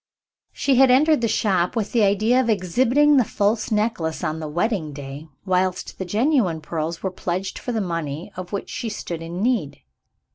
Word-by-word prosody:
She 270 -3 +1
had 265 0 +6
entered 295 +3 +4
the 230 - +2
shop 190 -4 +1
with 220 -3 -2
the 235 - +2
idea 215 +5 +3
of 240 - -2
exhibiting 250 +9 +3
the 255 - +5
false 210 +1 0
necklace 210 -7 -1
on 155 +1 -2
the 155 - -5
wedding 175 -1 -1
day, 140 +2 -8 0.2
whilst 185 -1 -1
the 190 - -3
genuine 210 - +1
pearls 160 +1 -4
were 190 - -1
pledged 185 +1 -3
for 245 - -4
the 225 -2 -1
money 165 -1 -4
of 185 -1 -7
which 200 - -4
she 230 - -3
stood 170 -5 -5
in 170 +4 -4
need. 225 - 0
195 Hz, 185 wpm, -22 LUFS, 170-235 Hz, 0.2 s, had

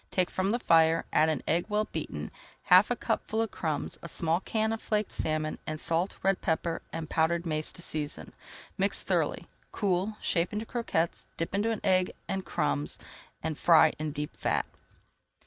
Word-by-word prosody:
Take 185 -1 +1
from 190 +1 0
the 230 - +2
fire, 165 -6 +4
add 155 - +5
an 155 -4 -1
egg 170 +2 +2
well 210 +1 +1
beaten, - - -5 0.3
half - - +6
a - - +1
cupful 220 - -1
of 225 -2 0
crumbs, 155 -4 -3
a 170 - -7
small 165 +1 +1
can 220 +2 0
of 225 - -4
flaked 210 -1 0
salmon, 155 0 -2
and 155 0 -3
salt, 170 +5 0
red 195 -1 +2
pepper, 165 +1 -1
and 165 -1 -4
powdered 165 +2 +1
mace 155 -1 -1
to 175 - -8
season. 150 -2 -4 0.5
Mix - - +2
thoroughly, - - 0 0.3
cool, 200 +1 0
shape 170 +2 +1
into 215 +2 -2
croquettes, 195 -9 -1
dip 165 - -3
into 220 +2 +1
egg 185 -1 +3
and 190 0 -2
crumbs, 75 - -1 0.5
and 160 -2 -3
fry 165 -2 +6
in 155 -1 -2
deep 150 0 -5
fat. - - 0
170 Hz, 175 wpm, -29 LUFS, 160-200 Hz, 0.5 s, half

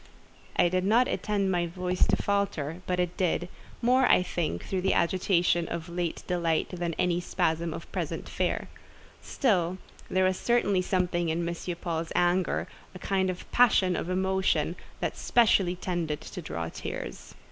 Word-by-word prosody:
I - - +4
did 185 +1 0
not 230 +6 +4
intend 200 -3 0
my 175 -1 +1
voice 180 +1 0
to - - +3
falter, 190 -6 -1
but 180 0 0
it 180 0 0
did: 175 -1 0 0.4
more, 255 +2 +4
I - - +5
think, 160 - -3
through 190 -1 -2
the 190 - +2
agitation 175 -1 +2
of 170 +1 -5
late 175 -1 -3
delight 170 -3 0
than 175 -2 -3
in - - -12
any 180 -1 +2
spasm 170 -2 0
of 165 - -6
present - - -3
fear. - - -1 0.5
Still 185 - +1 0.3
there 185 0 +3
certainly 205 -2 +2
was 180 - -2
something 175 -2 +1
in 170 +1 -1
M. 170 - -2 0.3
Paul's 165 -1 -3
anger—a 175 +1 0
kind 190 0 0
of 180 0 -6
passion 205 -7 +4
of 170 - -3
emotion—that 190 +1 -1
specially 200 -6 +3
tended 175 -4 -3
to - - -7
draw 80 +1 -4
tears. - - -7
180 Hz, 160 wpm, -28 LUFS, 170-190 Hz, 0.5 s, I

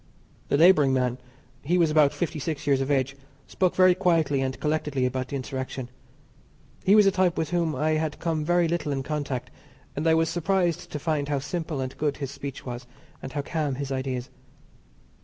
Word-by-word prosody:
The - - +2
labouring 155 -5 +6
man 125 -1 0 0.4
he 175 +5 +1
was 165 -3 +3
about 150 -2 +5
fifty 165 -3 -3
six 155 0 -4
years 140 -2 +3
of 135 - -2
age 135 -1 +1 0.3
spoke 185 -2 0
very 185 -1 +6
quietly 165 -7 +2
and 130 0 -2
collectedly 150 -4 0
about 130 0 -2
the 140 - -5
insurrection. 130 -1 -5 0.9
He 195 - +5
was 210 -1 +7
a 195 - +5
type 185 -2 +1
with 160 -2 -1
whom 170 -4 0
I 155 +4 +1
had 155 -1 -1
come 160 -3 -1
very 175 +1 +2
little 160 -3 -1
in 135 -1 -2
contact, 145 -4 -3 0.4
and 150 +3 -1
I 160 - +5
was 165 0 +2
surprised 175 0 0
to - - -3
find 150 -1 -1
how 145 - +1
simple 150 0 -3
and 130 0 -4
good 145 -1 0
his 140 -2 -4
speech 140 -1 -7
was, 120 -1 -6 0.3
and 135 - -7
how 145 -1 -2
calm 150 -3 -2
his 140 0 -4
ideas. 130 -1 -3
150 Hz, 195 wpm, -26 LUFS, 135-165 Hz, 0.9 s, was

